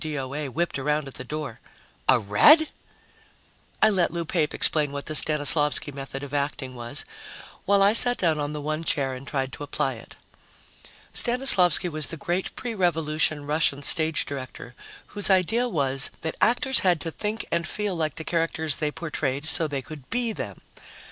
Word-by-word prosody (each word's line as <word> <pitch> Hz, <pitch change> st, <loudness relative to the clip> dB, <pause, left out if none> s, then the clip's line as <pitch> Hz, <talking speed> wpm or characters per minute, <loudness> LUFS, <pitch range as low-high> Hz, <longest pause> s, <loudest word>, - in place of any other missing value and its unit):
O.A. 145 Hz, -1 st, -4 dB
whipped 170 Hz, +2 st, -2 dB
around 150 Hz, +1 st, -1 dB
at 135 Hz, -, -8 dB
the 130 Hz, -, -7 dB
door. 145 Hz, -2 st, -6 dB, 0.5 s
"A 130 Hz, -, +6 dB
Red?" 205 Hz, -, +5 dB, 1.1 s
I 215 Hz, -, +6 dB
let 185 Hz, -4 st, +1 dB
Lou 170 Hz, -1 st, -4 dB
Pape 155 Hz, -2 st, -1 dB
explain 150 Hz, -3 st, +2 dB
what 140 Hz, 0 st, -6 dB
the 155 Hz, -, -4 dB
Stanislavsky 150 Hz, -1 st, +2 dB
method 135 Hz, 0 st, -8 dB
of 145 Hz, 0 st, -9 dB
acting 140 Hz, -2 st, -3 dB
was, 120 Hz, -1 st, +1 dB, 0.6 s
while 200 Hz, 0 st, +3 dB
I 200 Hz, +2 st, +4 dB
sat 245 Hz, +1 st, +6 dB
down 160 Hz, -4 st, 0 dB
on 145 Hz, 0 st, -3 dB
the 150 Hz, -1 st, -6 dB
one 155 Hz, +2 st, -3 dB
chair 135 Hz, -4 st, -1 dB
and 130 Hz, +2 st, -9 dB
tried 135 Hz, -2 st, -3 dB
to -, -, -7 dB
apply 145 Hz, -, -2 dB
it. -, -, -13 dB, 1.0 s
Stanislavsky 235 Hz, -, +2 dB
was 155 Hz, -3 st, -3 dB
the 165 Hz, -, -7 dB
great 175 Hz, +5 st, -3 dB
pre 240 Hz, -2 st, -5 dB
Revolution 155 Hz, -5 st, 0 dB
Russian 145 Hz, -1 st, +1 dB
stage 160 Hz, +2 st, +5 dB
director 130 Hz, -2 st, -8 dB, 0.4 s
whose 205 Hz, -1 st, -4 dB
idea 215 Hz, +6 st, +2 dB
was 135 Hz, -, +5 dB
that 160 Hz, -, -4 dB
actors 255 Hz, +2 st, +3 dB
had 180 Hz, -3 st, +2 dB
to 165 Hz, -, -5 dB
think 210 Hz, +6 st, -4 dB
and 170 Hz, -, -1 dB
feel 210 Hz, -3 st, -3 dB
like 155 Hz, -3 st, -2 dB
the 160 Hz, -, -5 dB
characters 160 Hz, -3 st, -1 dB
they 150 Hz, -, 0 dB
portrayed 150 Hz, -3 st, -4 dB
so 160 Hz, 0 st, +2 dB
they 140 Hz, -3 st, -4 dB
could 145 Hz, -2 st, -11 dB
be 235 Hz, -1 st, -1 dB
them. -, -, -7 dB
155 Hz, 175 wpm, -24 LUFS, 140-175 Hz, 1.1 s, A